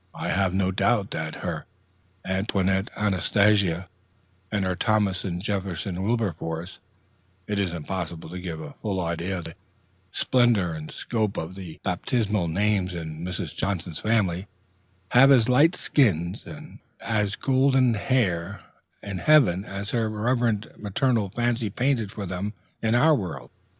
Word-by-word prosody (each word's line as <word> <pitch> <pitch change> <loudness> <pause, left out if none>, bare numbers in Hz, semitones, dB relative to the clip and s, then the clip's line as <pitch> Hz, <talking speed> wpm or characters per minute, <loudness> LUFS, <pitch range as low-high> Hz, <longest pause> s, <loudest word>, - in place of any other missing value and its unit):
I - - -3
have 95 -1 +2
no 95 0 +1
doubt 100 +2 +1
that 80 0 -3
her - - -3 0.6
Antoinette 95 0 0
Anastasia 100 -2 +2 0.6
and 100 -2 0
her 95 -1 0
Thomas 105 -1 +1
Jefferson 95 -1 -3
Wilberforce 90 -5 -2 0.7
it 105 +1 -1
is 95 -3 0
impossible 85 0 -5
to 90 +2 -6
give 85 -3 -5
a 70 - -8
full 100 -3 -1
idea 85 +2 -2
of 85 - -5
the 80 - -8 0.6
splendor 115 -10 +2
and 75 -1 -7
scope 110 -3 -2
of 80 +3 -4
the 95 -4 -9
baptismal 105 0 0
names 95 +1 +1
in 80 -1 -6
Mrs. 90 -1 -4
Johnson's 90 -4 -2
family 100 -4 +1 0.6
have 135 +3 +7
as 120 -4 +6
light 145 +8 +5
skins 90 - +1
and - - -10 0.2
as 105 -2 0
golden 130 -2 +3
hair 100 -5 0 0.4
in 100 -2 -4
heaven 100 - +5
as 100 0 -5
her 115 -2 +1
reverend 110 0 0
maternal 110 0 +1
fancy 120 +1 0
painted 120 -1 0
for 100 -1 -5
them 95 +3 -3 0.3
in 110 +1 +2
our 155 +6 +5
world. 80 - -3
100 Hz, 140 wpm, -25 LUFS, 90-110 Hz, 0.7 s, have